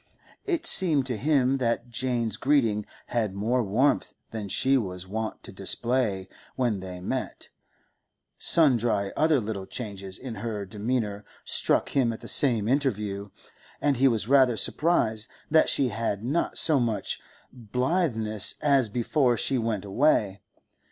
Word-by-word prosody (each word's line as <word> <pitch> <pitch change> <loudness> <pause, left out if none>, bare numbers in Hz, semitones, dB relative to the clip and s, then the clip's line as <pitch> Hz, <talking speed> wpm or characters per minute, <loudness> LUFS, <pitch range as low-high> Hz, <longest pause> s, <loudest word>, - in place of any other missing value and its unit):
It 340 -4 -1
seemed 160 - +3
to 125 -2 -1
him 135 +1 +1
that 120 -1 -1
Jane's 120 -3 -1
greeting 115 -7 +1 0.2
had 110 -5 -1
more 115 +5 0
warmth 120 +7 +1 0.2
than 105 -3 -5
she 135 +7 +2
was 90 -7 -2
wont 110 +3 -5
to - - -9
display 100 0 -1 0.3
when 120 -6 0
they 90 -1 -8
met; 90 - -4 0.9
sundry 120 -10 +2
other 155 -2 +3
little 105 -4 -5
changes 100 -5 -6
in 130 -3 -7
her 105 -3 -4
demeanour 105 0 -3 0.2
struck - - +1
him 130 -4 +1
at 115 - -8
the - - -9
same 115 -7 +2
interview, 105 -7 -1 0.5
and 145 -3 +1
he 135 +2 +4
was 115 -4 0
rather 130 -3 +4
surprised 110 -11 +1 0.2
that 160 0 +5
she 135 -3 +2
had 105 -2 -3
not 145 +8 -1
so 155 -4 +6
much 115 -3 -2 0.3
blitheness 120 - 0
as 140 -6 +3
before 120 +2 +1
she 130 +2 +1
went 110 -4 -2
away. 100 -3 +1
115 Hz, 140 wpm, -26 LUFS, 105-135 Hz, 0.9 s, so